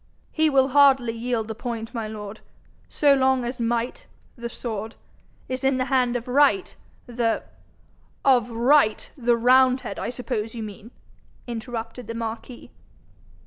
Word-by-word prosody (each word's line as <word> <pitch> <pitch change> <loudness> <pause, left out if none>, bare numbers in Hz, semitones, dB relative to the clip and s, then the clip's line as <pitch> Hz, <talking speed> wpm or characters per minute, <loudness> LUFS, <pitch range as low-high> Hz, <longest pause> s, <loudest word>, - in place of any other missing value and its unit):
'He 315 -1 +2
will 270 -1 +3
hardly 270 -4 +5
yield 230 -1 -2
the 220 - -4
point, 230 0 -5
my 225 -3 -3
lord. 210 -1 -8 0.5
So 290 -2 +4
long 265 -2 +2
as 245 +2 -5
Might, 235 +1 -2 0.3
the 235 -1 -6
sword, 225 -2 -5 0.5
is 255 0 -4
in 265 -1 +2
the 255 - 0
hand 250 -2 +2
of 245 0 -3
Right, 290 +8 +3 0.3
the 235 -2 -1 0.4
' - - -32
'Of 250 -4 +4
Right, 235 0 +2
the 240 -3 +2
roundhead, 255 +2 +3
I - - -3
suppose 240 -3 -4
you 225 - -4
mean,' 210 +1 -9 0.6
interrupted 230 0 -6
the 230 - -5
marquis. 230 +2 -6
240 Hz, 145 wpm, -24 LUFS, 230-260 Hz, 0.6 s, hardly